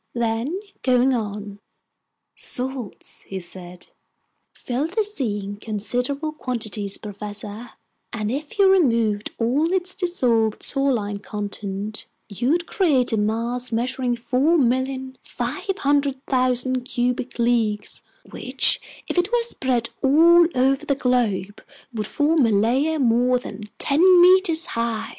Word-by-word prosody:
Then, 235 Hz, +9 st, -1 dB, 0.2 s
going 255 Hz, 0 st, +3 dB
on: 205 Hz, -3 st, -4 dB, 0.7 s
"Salts," 255 Hz, -4 st, -4 dB
he 195 Hz, -, -5 dB
said, 180 Hz, 0 st, -8 dB, 0.6 s
"fill 260 Hz, +5 st, -3 dB
the 395 Hz, +6 st, 0 dB
sea 250 Hz, -, -1 dB
in 200 Hz, +1 st, -6 dB
considerable 245 Hz, +8 st, -2 dB
quantities, 220 Hz, -8 st, -4 dB
professor, 210 Hz, +2 st, -6 dB, 0.4 s
and 215 Hz, -1 st, -3 dB
if 290 Hz, +7 st, -5 dB
you 395 Hz, -1 st, +6 dB
removed 230 Hz, -, +2 dB
all 275 Hz, +9 st, +1 dB
its 370 Hz, 0 st, +1 dB
dissolved 240 Hz, -, +1 dB
saline 240 Hz, -8 st, 0 dB
content, 205 Hz, 0 st, -5 dB, 0.2 s
you'd 265 Hz, -, 0 dB
create 285 Hz, -, +1 dB
a -, -, +2 dB
mass 235 Hz, +4 st, -1 dB
measuring 245 Hz, +2 st, -1 dB
4,500,000 260 Hz, -, 0 dB
cubic 245 Hz, 0 st, -2 dB
leagues, 230 Hz, -3 st, 0 dB, 0.3 s
which -, -, +1 dB, 0.3 s
if -, -, 0 dB
it 355 Hz, -, 0 dB
were 480 Hz, -1 st, +2 dB
spread 255 Hz, -, 0 dB
all 335 Hz, +5 st, +6 dB
over 270 Hz, +3 st, +2 dB
the 285 Hz, -2 st, 0 dB
globe, 225 Hz, -7 st, 0 dB, 0.3 s
would 215 Hz, -2 st, -3 dB
form 295 Hz, -1 st, +2 dB
a -, -, +1 dB
layer 255 Hz, +10 st, +2 dB
more 250 Hz, -1 st, +3 dB
than 215 Hz, -4 st, -8 dB, 0.2 s
ten 285 Hz, +3 st, +1 dB, 0.2 s
meters 355 Hz, -2 st, +5 dB
high. 230 Hz, -1 st, -2 dB
250 Hz, 115 wpm, -22 LUFS, 220-285 Hz, 0.7 s, you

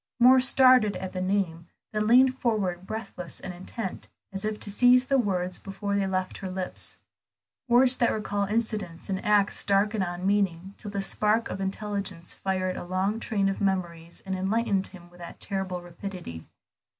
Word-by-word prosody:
Moor 255 Hz, +2 st, +8 dB
started 255 Hz, -4 st, +5 dB
at 190 Hz, -, -5 dB
the 185 Hz, -, -3 dB
name, 185 Hz, -3 st, -1 dB, 0.2 s
then 215 Hz, 0 st, 0 dB
leaned 255 Hz, +3 st, +6 dB
forward, 190 Hz, -6 st, -1 dB
breathless 200 Hz, -6 st, -6 dB
and 185 Hz, -, -6 dB
intent, 185 Hz, +3 st, -6 dB, 0.2 s
as 195 Hz, -, -4 dB
if 215 Hz, 0 st, -2 dB
to 205 Hz, -, -3 dB
seize 250 Hz, +4 st, +5 dB
the 270 Hz, 0 st, +2 dB
words 185 Hz, -5 st, -1 dB
before 200 Hz, +1 st, -4 dB
they 200 Hz, -1 st, +1 dB
left 185 Hz, -1 st, -2 dB
her 190 Hz, -, -5 dB
lips; 185 Hz, 0 st, -4 dB, 0.7 s
words 250 Hz, +1 st, +5 dB
that 235 Hz, -, +3 dB
recalled 205 Hz, -2 st, -2 dB
incidents 210 Hz, -7 st, -2 dB
and 190 Hz, -, -2 dB
acts 210 Hz, -2 st, +2 dB
dark 200 Hz, +2 st, +2 dB
and 210 Hz, -3 st, 0 dB
unmeaning 185 Hz, 0 st, -1 dB
till 210 Hz, -, -8 dB
the 200 Hz, -1 st, -2 dB
spark 215 Hz, +3 st, +1 dB
of 195 Hz, -, -4 dB
intelligence 195 Hz, -2 st, -2 dB
fired 185 Hz, -1 st, -2 dB
a -, -, -5 dB
long 190 Hz, +4 st, -1 dB
train 205 Hz, -4 st, 0 dB
of 195 Hz, -, -2 dB
memories 170 Hz, -4 st, -2 dB
and 190 Hz, -, -3 dB
enlightened 195 Hz, +1 st, 0 dB
him 175 Hz, -3 st, -13 dB
with 175 Hz, 0 st, -16 dB, 0.2 s
terrible 190 Hz, -3 st, -3 dB
rapidity. 175 Hz, -, -8 dB
195 Hz, 170 wpm, -27 LUFS, 185-215 Hz, 0.7 s, Moor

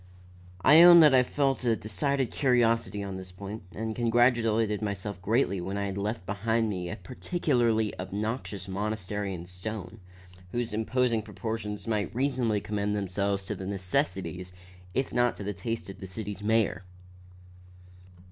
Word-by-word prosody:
I 150 Hz, +5 st, +8 dB
own 175 Hz, 0 st, +10 dB
that 150 Hz, -3 st, +7 dB
I 130 Hz, -, +7 dB
felt 135 Hz, +1 st, 0 dB
a 115 Hz, -2 st, +3 dB
decided 120 Hz, +6 st, -1 dB
curiosity 115 Hz, -6 st, +2 dB
on 95 Hz, -1 st, -5 dB
this 95 Hz, -1 st, -9 dB
point, 100 Hz, +4 st, -7 dB
and 110 Hz, 0 st, -4 dB
congratulated 115 Hz, -3 st, +2 dB
myself 100 Hz, -2 st, -4 dB
greatly 100 Hz, -2 st, +1 dB
when 95 Hz, +3 st, -3 dB
I 100 Hz, -, -1 dB
had 95 Hz, -1 st, -3 dB
left 100 Hz, -1 st, -3 dB
behind 110 Hz, +3 st, 0 dB
me 90 Hz, -3 st, -4 dB
a 100 Hz, -, -4 dB
peculiarly 120 Hz, -, 0 dB
obnoxious 100 Hz, +1 st, -4 dB
monstrosity 100 Hz, 0 st, -3 dB
in 85 Hz, 0 st, -8 dB
stone, 95 Hz, +3 st, -7 dB, 0.5 s
whose 120 Hz, -2 st, -2 dB
imposing 115 Hz, +1 st, +1 dB
proportions 105 Hz, 0 st, -5 dB
might 105 Hz, -2 st, -1 dB
reasonably 125 Hz, -5 st, +1 dB
commend 105 Hz, 0 st, -1 dB
themselves 100 Hz, 0 st, -1 dB
to -, -, -3 dB
the 95 Hz, -, -6 dB
necessities, 90 Hz, -2 st, -2 dB, 0.4 s
if 135 Hz, -, -1 dB
not 120 Hz, 0 st, +2 dB
to -, -, -7 dB
the 105 Hz, +1 st, -3 dB
taste 115 Hz, +4 st, -4 dB
of 95 Hz, -, -9 dB
the 95 Hz, -, -7 dB
city's 100 Hz, 0 st, -6 dB
mayor. 105 Hz, -4 st, +1 dB
105 Hz, 150 wpm, -28 LUFS, 100-115 Hz, 0.5 s, own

